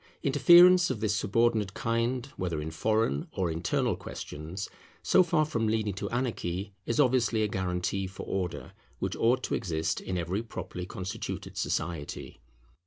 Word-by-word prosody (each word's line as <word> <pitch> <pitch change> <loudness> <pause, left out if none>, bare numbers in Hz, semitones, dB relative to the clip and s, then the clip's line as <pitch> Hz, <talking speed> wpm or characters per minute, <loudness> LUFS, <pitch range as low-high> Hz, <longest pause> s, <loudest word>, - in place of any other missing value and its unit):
Interference 175 +6 +7
of 130 -5 -2
this 105 -1 0
subordinate 105 -1 +1
kind, 115 +2 0
whether 85 -4 -2
in 75 +1 -4
foreign 110 -3 0
or 90 -4 -1
internal 80 +1 0
questions, 85 +6 -6 0.4
so - - +5
far 170 -3 +2
from 115 -7 -1
leading 110 -2 0
to 95 - -4
anarchy, 100 -6 -2
is 115 - 0
obviously 120 -5 +3
a - - +2
guarantee 95 0 -2
for 95 - -8
order 90 -3 -3 0.3
which - - -2
ought 120 +3 +2
to - - -2
exist 80 -3 -1
in 95 - -3
every 90 +4 -1
properly 90 -5 -6
constituted 95 +1 -5
society. 80 -4 -3
105 Hz, 150 wpm, -29 LUFS, 90-120 Hz, 0.4 s, Interference